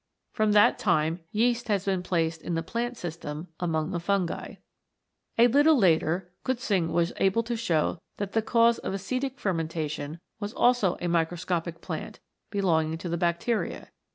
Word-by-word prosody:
From 215 -2 +2
that 205 0 +5
time 160 +2 +1
yeast 235 +2 +1
has 200 -3 0
been 190 -2 0
placed 165 -3 -1
in 170 - -3
the 165 - -1
plant 240 +6 -3
system 160 -2 -6
among 160 -3 -1
the 175 - -1
fungi. 185 0 -1 0.8
A 235 - +7
little 290 +5 +5
later 175 -2 +2
Kutzing 215 -10 0
was 170 +1 +1
able 195 +4 +2
to 235 +1 -2
show 175 -7 0 0.2
that 200 -1 -3
the 225 - +2
cause 230 +1 +3
of 195 - -3
acetic 255 +8 -3
fermentation 160 -4 -2 0.2
was 205 +1 -4
also 240 -7 +3
a 175 - -1
microscopic 170 0 -1
plant, 160 -4 -6 0.3
be 200 -1 -2
longing 160 -3 +1
to 170 +1 -6
the 170 - -1
bacteria. 175 +7 -1
180 Hz, 160 wpm, -27 LUFS, 165-225 Hz, 0.8 s, A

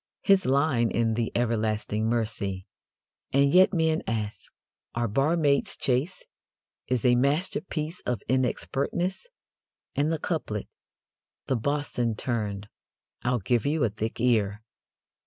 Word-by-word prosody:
His 195 -5 +4
line 135 -4 +3
in 115 -1 +1
The 115 0 -1
Everlasting 110 -2 0
Mercy: 100 -5 -2 0.7
And 140 +1 +3
yet 185 +1 +7
men 160 -3 +1
ask, 110 -2 -3 0.4
"Are 120 0 0
barmaids 140 +5 +2
chaste?" 135 +8 -1 0.6
is 125 -2 0
a 125 - +6
masterpiece 155 +4 0
of 120 -5 -3
inexpertness. 135 - -1 0.7
And 145 +3 +1
the 165 - 0
couplet: 145 - -3 0.8
The 130 - 0
Bosun 125 -2 -1
turned: 105 -4 -3 0.5
"I'll 125 +1 +1
give 120 +5 +1
you 150 -1 +1
a 115 - +3
thick 110 +2 -4
ear! 110 -3 +1
125 Hz, 120 wpm, -27 LUFS, 110-150 Hz, 0.8 s, yet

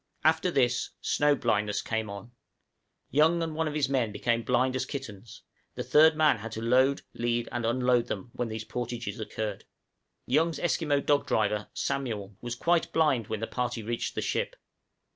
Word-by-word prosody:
After 160 +3 +3
this, 125 -6 +1
snow 145 0 +2
blindness 105 -5 0
came 110 -1 -2
on; 100 +4 -8 0.8
Young 160 +4 +4
and 160 -1 -3
one 160 +1 -1
of 150 - -3
his 145 -3 +2
men 130 -5 0
became 115 +2 0
blind 125 +2 +1
as 130 - 0
kittens; 120 -6 -8 0.3
and - - -4
the - - -20
third 155 +1 +6
man 155 -5 +4
had 110 +2 -7
to 110 - -4
load, 130 +4 +3
lead, 120 0 -1
and 120 -1 -1
unload 125 0 +2
them, 105 +2 -5
when 120 - -2
these 110 0 -5
portages 120 -3 -4
occurred. 110 -2 -4 0.6
Young's 155 +4 +2
Esquimaux 150 -4 +1
dog 145 0 +2
driver, 105 -1 0
Samuel, 110 -8 -3
was 120 0 -4
quite 170 +4 +1
blind 145 -10 +2
when 110 -1 -3
the - - 0
party 120 -1 -3
reached 115 +2 -3
the - - -1
ship. - - -1
120 Hz, 180 wpm, -28 LUFS, 110-145 Hz, 0.8 s, third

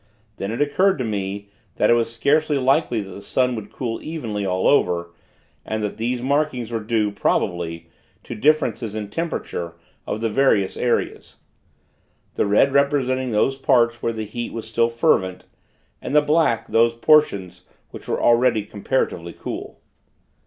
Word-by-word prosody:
Then 100 - -4
it 115 - -4
occurred 185 +6 +2
to 130 - -2
me, 100 -2 -4 0.3
that 105 - +3
it - - +7
was 115 -1 +1
scarcely 145 +5 +1
likely 130 -3 +1
that 95 -1 -9
the 100 - -9
sun 125 +4 0
would 110 -2 -7
cool 115 -3 -4
evenly 115 -11 -4
all 95 -1 0
over; 85 -10 +2 0.5
and 110 -1 -3
that 105 - -3
these 120 +2 -2
markings 135 -4 0
were 115 - -1
due, 105 -1 0
probably, 85 -4 -1 0.4
to - - -7
differences 115 -4 +1
in 105 -2 -5
temperature 105 - -4 0.3
of - - -3
the 115 - 0
various 105 -5 +2
areas; 120 - -2 1.0
the - - 0
red 105 +7 +3
representing 135 -2 +1
those 120 +5 +1
parts 120 -3 +2
where 115 - 0
the 110 -1 -5
heat 120 +3 -5
was 115 -1 -6
still 115 +1 +1
fervent, 95 -5 +1 0.6
and - - -4
the 150 - +7
black 150 -6 +1
those 115 +1 +3
portions 100 - +2 0.3
which - - -11
were - - -1
already 120 -3 +3
comparatively 100 -6 -2
cool. - - -7
115 Hz, 160 wpm, -22 LUFS, 105-130 Hz, 1.0 s, it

